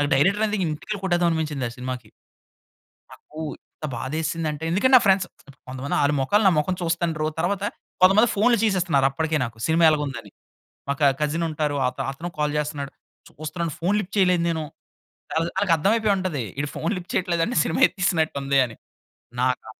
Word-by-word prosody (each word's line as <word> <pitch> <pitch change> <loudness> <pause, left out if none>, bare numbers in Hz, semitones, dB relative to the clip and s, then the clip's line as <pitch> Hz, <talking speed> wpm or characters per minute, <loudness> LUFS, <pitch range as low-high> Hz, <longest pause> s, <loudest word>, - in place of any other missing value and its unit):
Director 195 +10 +3 0.2
ఇంటికెళ్లి 175 +7 -4
కొట్టేదాం 175 -2 +2
అనిపించింది 150 -5 -2
ఆ - - -10
సినిమాకి. 125 -1 -6 1.0
నాకు 155 - -15 0.2
ఎంత 155 - -9
బాధ 130 +4 -5
ఎసిందంటే, 160 -1 -3
ఎందుకంటే 260 +9 +3
నా - - +7
ఫ్రెండ్స్, 190 -1 +4 0.4
కొంతమంది 130 +2 -4
వాళ్ళ 145 +1 +2
మొఖాలు 205 +11 +2
నా - - +4
మొఖం 180 +5 +1
చూస్తుండరు. 165 -2 -1
తర్వాత 195 +3 -1 0.4
కొంతమంది 205 +5 +6
ఫోన్‌లు 235 +3 +4
చేసేస్తున్నారప్పటికే 160 -6 +1
నాకు 115 -2 -7
సినిమా 165 +1 +3
ఎలాగుందని? 135 -8 -3 0.6
మా 140 - +2
క - - 0 0.2
కజిన్ 160 +3 0
ఉంటారు. 150 -1 -1
అత్ 130 +1 -4
అతను 165 +6 -6
కాల్ 150 -1 0
చేస్తున్నాడు. 145 -2 -4 0.4
చూస్తున్నాను 155 +1 -5
ఫోన్ 185 +5 +1
లిఫ్ట్ 200 0 -6
చేయలేదు 180 -3 +3
నేను. 160 -1 -1 0.7
ఆళ్ళ 165 +1 +1
ఆళ్ళకర్థం 190 0 +2
అయిపోయి 215 -2 +2
ఉంటది. 170 -9 -2
వీడు 145 +1 -2
ఫోన్ 165 +6 -1
లిఫ్ట్ 180 0 -7
చేయట్లేదంటే 170 -2 0
సినిమా 160 - -1
ఎత్తేసినట్టు 170 -6 0
ఉంది 135 0 +2
అని. 115 -2 -8 0.6
నాకా 125 -2 0
160 Hz, 160 wpm, -24 LUFS, 145-185 Hz, 1.0 s, నా